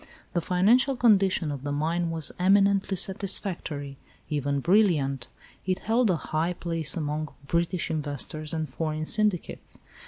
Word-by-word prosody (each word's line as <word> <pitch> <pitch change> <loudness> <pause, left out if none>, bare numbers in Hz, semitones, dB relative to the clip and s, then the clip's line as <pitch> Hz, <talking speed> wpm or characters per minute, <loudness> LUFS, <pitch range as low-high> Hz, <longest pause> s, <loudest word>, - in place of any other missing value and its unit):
The 175 - +1
financial 225 - +3
condition 195 -9 +3
of 140 -2 -6
the 145 - -3
mine 165 +4 -1
was 160 -4 +3
eminently 195 +1 +3
satisfactory, 175 -7 -3 0.3
even 145 -1 -1
brilliant. 145 - +2 0.4
It 185 -1 +1
held 230 +1 +1
a 180 - +3
high 160 +2 -2
place 165 -2 0
among 155 -1 -3 0.2
British 170 +3 -1
investors 150 0 -2
and 160 -1 -2
foreign 155 +3 -3
syndicates. 210 -1 0
165 Hz, 130 wpm, -26 LUFS, 150-195 Hz, 0.4 s, financial